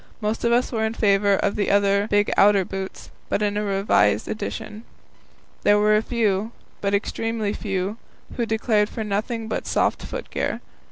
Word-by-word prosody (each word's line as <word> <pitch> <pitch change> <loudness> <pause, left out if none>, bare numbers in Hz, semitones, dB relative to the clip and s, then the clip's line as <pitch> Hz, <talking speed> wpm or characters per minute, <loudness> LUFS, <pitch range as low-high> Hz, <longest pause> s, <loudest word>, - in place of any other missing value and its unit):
Most 215 0 -2
of 235 - +2
us 245 +1 +2
were 225 -3 -1
in 220 +1 -1
favour 200 -2 +3
of 200 - 0
the 200 0 +2
big 205 0 +2
outer 200 -2 +5
boots, 190 0 -7 0.2
but 210 - 0
in 205 0 0
a 210 - 0
revised 195 - +2
edition. 215 0 -5 0.8
There 205 0 +4
were 210 +1 +4
a 215 - +3
few 220 -2 0 0.3
but 200 0 +1
extremely 220 0 -2
few 195 0 -3 0.4
who 235 -2 -1
declared 220 -1 +1
for 225 - -4
nothing 220 +2 -2
but 220 - -3
soft - - +1
foot - - -7
gear. - - -2
210 Hz, 170 wpm, -23 LUFS, 200-220 Hz, 0.8 s, outer